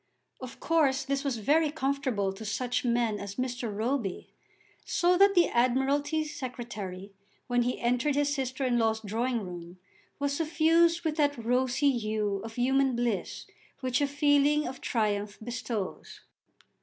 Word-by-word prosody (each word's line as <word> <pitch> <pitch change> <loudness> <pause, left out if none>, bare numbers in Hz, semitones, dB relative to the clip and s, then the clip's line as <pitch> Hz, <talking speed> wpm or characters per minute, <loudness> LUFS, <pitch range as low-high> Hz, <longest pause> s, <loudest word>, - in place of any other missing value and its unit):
Of 255 -1 -9
course 290 -5 +2
this 275 0 -2
was 275 -4 -1
very 300 +8 +2
comfortable 270 -9 -1
to 205 +3 -9
such 245 +5 -2
men 235 -3 +1
as 200 0 -6
Mr. 250 -3 -3
Roby, 220 -1 -2 0.5
so 355 0 +2
that 395 +2 +5
the 350 - +5
Admiralty 270 +6 +1
Secretary 225 -9 -7 0.3
when 245 0 +1
he 245 +1 -1
entered 250 +4 +1
his 290 0 +1
sister 265 -1 -2
in 245 -2 +2
law's 220 -1 +1
drawing 230 +3 -1
room 175 -1 -8 0.4
was 285 0 -1
suffused 330 +2 +3
with 310 0 -1
that 290 -2 +2
rosy 255 +4 +1
hue 215 -3 -1
of 225 0 -8
human 265 +1 +2
bliss 235 -6 -2 0.4
which 255 0 0
a 285 - +2
feeling 290 +1 +3
of 260 +1 -7
triumph 210 -2 -1
bestows. 225 -3 -5
255 Hz, 145 wpm, -29 LUFS, 225-285 Hz, 0.5 s, that